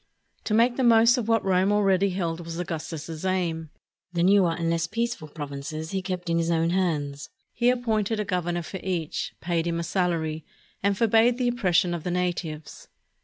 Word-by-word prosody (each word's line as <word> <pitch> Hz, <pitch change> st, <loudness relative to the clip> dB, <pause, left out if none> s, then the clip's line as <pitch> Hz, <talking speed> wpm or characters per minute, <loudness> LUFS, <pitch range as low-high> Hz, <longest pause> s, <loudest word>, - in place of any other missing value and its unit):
To 215 Hz, -, +1 dB
make 240 Hz, +2 st, +3 dB
the 265 Hz, -, +1 dB
most 230 Hz, +1 st, +6 dB
of 225 Hz, -, -3 dB
what 225 Hz, -2 st, +2 dB
Rome 190 Hz, +1 st, +3 dB
already 200 Hz, -1 st, +3 dB
held 175 Hz, -3 st, -2 dB
was 165 Hz, 0 st, -6 dB
Augustus's 165 Hz, -1 st, -5 dB
aim. 170 Hz, -4 st, -1 dB, 0.4 s
The 170 Hz, -1 st, 0 dB
newer 185 Hz, -2 st, +4 dB
and 170 Hz, -1 st, -2 dB
less 165 Hz, 0 st, 0 dB
peaceful 230 Hz, -6 st, -3 dB
provinces 150 Hz, +1 st, -6 dB
he 190 Hz, -1 st, -1 dB
kept 180 Hz, -1 st, -4 dB
in 170 Hz, 0 st, +1 dB
his 165 Hz, 0 st, 0 dB
own 165 Hz, 0 st, +2 dB
hands. 150 Hz, -6 st, -1 dB, 0.2 s
He 240 Hz, +1 st, +2 dB
appointed 225 Hz, -3 st, 0 dB
a 210 Hz, -, -1 dB
governor 175 Hz, -2 st, -1 dB
for 190 Hz, +4 st, -7 dB
each, 175 Hz, -5 st, -3 dB
paid 170 Hz, -1 st, -1 dB
him 170 Hz, 0 st, -1 dB
a -, -, -2 dB
salary, 165 Hz, -3 st, -1 dB, 0.4 s
and 200 Hz, 0 st, +1 dB
forbade 230 Hz, +2 st, +4 dB
the 250 Hz, -1 st, 0 dB
oppression 180 Hz, -7 st, +2 dB
of 170 Hz, -3 st, -4 dB
the -, -, -2 dB
natives. 175 Hz, -4 st, -3 dB
180 Hz, 185 wpm, -26 LUFS, 165-205 Hz, 0.4 s, most